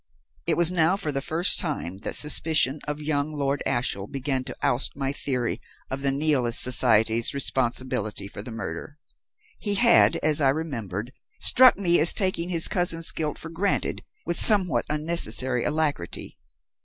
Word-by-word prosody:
"It - - 0
was 175 0 +5
now 175 +1 +1
for 155 -6 -4
the 135 -1 -4
first 165 +6 +3
time 140 - -4
that - - -6
suspicion 150 -2 0
of 150 0 -5
young 150 0 -3
Lord 140 -1 -3
Ashiel 105 -5 -2
began 135 0 -3
to 130 - -9
oust 125 - 0
my 135 -1 -3
theory 125 -4 -3 0.3
of 135 +1 -4
the 140 0 +1
Nihilist 135 -5 0
society's 115 0 +2
responsibility 125 -6 -3
for 100 - -9
the 110 - -10
murder. 115 +5 -8 0.6
He 205 -1 -1
had, 235 -5 +4
as 155 0 +2
I 135 - +2
remembered, 125 - -5 0.3
struck 255 -3 +6
me 175 -3 +1
as 160 +3 +6
taking 185 -4 -1
his 165 -3 +5
cousin's 170 -3 0
guilt 155 -2 -4
for 165 - -8
granted 185 +5 -3 0.2
with 170 - +1
somewhat 180 - +6
unnecessary 150 -5 0
alacrity. 150 - -4
145 Hz, 155 wpm, -23 LUFS, 125-165 Hz, 0.6 s, struck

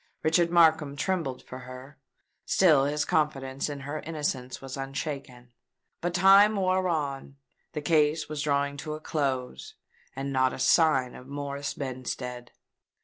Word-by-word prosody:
Richard 170 +2 +3
Markham 160 -4 +4
trembled 155 -6 -2
for 130 - -9
her: 130 +2 -11 0.4
still 155 -8 +4
his 145 +1 0
confidence 135 -3 -1
in 145 -1 -6
her 145 +3 -5
innocence 145 -6 -4
was 135 -1 -7
unshaken. 135 -3 -6 0.5
But 175 0 -2
time 195 +4 +6
wore 185 -1 +1
on: 140 -4 -3 0.4
the 150 - -3
case 150 0 +2
was 150 -1 -4
drawing 140 -1 0
to 155 +1 -5
a - - -8
close;—and 135 - -5
not 130 -1 +2
a - - -6
sign 135 -3 +3
of 125 - -12
Morris 140 0 -4
Benstead! 125 -2 -5
145 Hz, 140 wpm, -27 LUFS, 135-155 Hz, 0.5 s, time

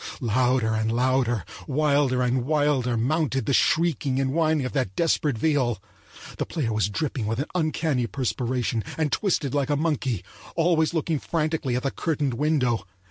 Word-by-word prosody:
Louder 125 -1 +1
and 110 0 0
louder, 120 -4 +1 0.2
wilder 140 -3 +2
and 125 0 +1
wilder, 145 -4 +1
mounted 135 0 0
the 140 - 0
shrieking 145 -4 +2
and 135 0 0
whining 155 -3 +2
of 130 - -3
that 130 -9 -2
desperate 155 -6 +1
viol. 130 - +1 0.6
The - - 0
player 125 -9 -2
was 105 -1 +1
dripping 125 -1 -2
with 110 +1 -1
an 140 - -1
uncanny 155 -7 0
perspiration 125 -2 -1
and 155 -3 0
twisted 165 -9 0
like 145 0 0
a 145 - +2
monkey, 135 - -1 0.3
always 165 -1 +2
looking 160 -1 0
frantically 155 -6 -1
at 125 - -2
the 135 - 0
curtained 150 -5 -1
window. 125 -6 0
135 Hz, 160 wpm, -25 LUFS, 120-155 Hz, 0.6 s, wilder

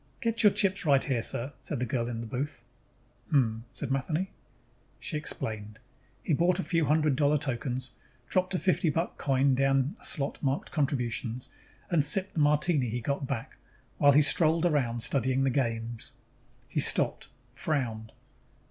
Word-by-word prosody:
"Get 230 0 0
your 210 - +7
chips 195 -1 +2
right 140 -4 +4
here, 125 -4 0
sir," 125 +4 -1
said 135 +2 -4
the 125 - 0
girl 120 0 -1
in 115 -1 -4
the - - -5
booth. 125 +1 -4 0.6
"Hm?" 115 -7 +1
said 140 -3 -5
Matheny. 155 +7 -1 0.7
She - - -4
explained. 110 -8 -4 0.5
He - - 0
bought 175 +4 +3
a 190 - -2
few 165 -2 +1
hundred 150 -1 +2
dollar 145 +1 +3
tokens, 130 -2 -3 0.4
dropped 185 0 0
a - - +2
fifty 180 -2 +1
buck 165 +4 -2
coin 135 0 +2
down 135 +3 +1
a - - -15
slot 140 -3 -2
marked 135 0 -1
CONTRIBUTIONS, 125 -5 -2 0.4
and 165 -4 +4
sipped 185 +7 +3
the - - -2
martini 150 -2 +2
he 120 +3 -2
got 140 +3 -2
back 130 -5 -5 0.4
while 145 -1 +6
he 150 +2 +6
strolled 160 +3 +3
around 125 -8 +1
studying 130 0 +1
the 135 - +2
games. 115 -3 -3 0.5
He 150 - -2
stopped, - - +2 0.3
frowned. 115 -7 -2
140 Hz, 165 wpm, -29 LUFS, 125-155 Hz, 0.7 s, your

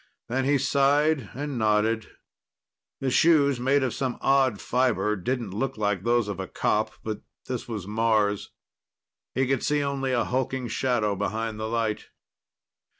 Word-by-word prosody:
Then 130 +2 0
he 140 +1 +3
sighed 140 -1 +2
and 140 -2 -3
nodded. 110 +1 +1 0.9
The 135 -1 0
shoes, 140 -4 +4
made 135 +3 +2
of 130 - -1
some 130 -2 -2
odd 135 -6 +3
fiber, 115 -5 +1
didn't 115 +2 -3
look 135 +5 -2
like 105 -3 0
those 120 0 +2
of 100 -3 -4
a 95 - -4
cop, - - 0
but 110 -1 -4 0.2
this 125 -2 -4
was 110 -6 -5
Mars. 105 -1 +1 0.9
He 135 - +2
could 135 -1 0
see 150 0 +1
only 135 -1 -1
a 120 -2 +2
hulking 130 0 -1
shadow 110 -3 0
behind 110 +2 -3
the 110 - -2
light. 115 -2 -1
120 Hz, 150 wpm, -26 LUFS, 110-135 Hz, 0.9 s, shoes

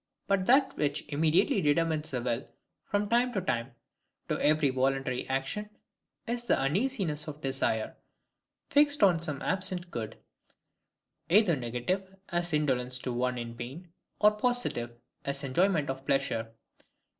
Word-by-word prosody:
But 195 -2 +1
that 270 +2 +4
which 145 -1 0
IMMEDIATELY 160 +7 +3
determines 155 0 +1
the 125 -3 -2
will 120 +2 -2 0.4
from 205 0 +1
time 240 +3 +2
to 195 - 0
time, 120 -7 -2 0.6
to - - 0
every 150 -2 +4
voluntary 130 -1 0
action, 135 +11 -2 0.6
is 240 +1 -2
the 240 - +3
UNEASINESS 160 - 0
OF 150 -1 -6
DESIRE, 130 -5 0 0.8
fixed 290 -3 +4
on 180 -4 +5
some 150 -4 -3
absent 185 -1 -1
good: 110 -3 -5 1.1
either 190 -2 +5
negative, 140 +11 -3
as 175 0 0
indolence 130 -5 +1
to 125 0 -4
one 125 +1 0
in 120 -1 -5
pain; 140 +9 -8 0.3
or 210 - +6
positive, 245 - 0 0.3
as 140 0 -3
enjoyment 155 +3 +2
of 135 0 -4
pleasure. 135 -5 0
150 Hz, 135 wpm, -30 LUFS, 130-195 Hz, 1.1 s, or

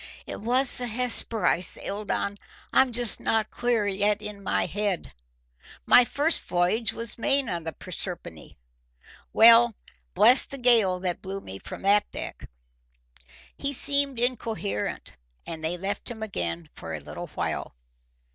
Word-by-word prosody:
"It - - -7
was 250 +4 +1
the 245 - -3
Hesper 235 -1 +1
I - - +3
sailed 200 +3 0
on. 200 0 -2 0.3
I'm 265 - +5
not 240 - -4
just 240 -3 +2 0.3
clear 240 -3 0
yet 205 +1 +1
in 210 -1 -7
my - - 0
head. 205 -3 -3 0.7
My 245 - +6
first 295 +6 +1
voyage 180 +5 +1
was 230 0 -5
made 275 +2 +2
on 170 -5 -4
the 160 - -3
Proserpine. 175 - -6 0.8
Well, 230 0 +6 0.4
bless 225 +7 +6
the 275 - -8
gale 230 -8 +3
that 180 -2 -2
blew 195 +1 -5
me 95 - -9
from - - -9
that 205 +1 +3
deck!" - - -7 1.1
He 280 - -2
seemed 280 -1 +3
incoherent, 225 - -3 0.3
and 160 -1 -7
they 165 +3 -2
left 195 +3 -4
him 220 -2 -7
again 85 - -4
for - - -7
a - - -6
little - - -8
while. - - -4
210 Hz, 145 wpm, -26 LUFS, 185-240 Hz, 1.1 s, My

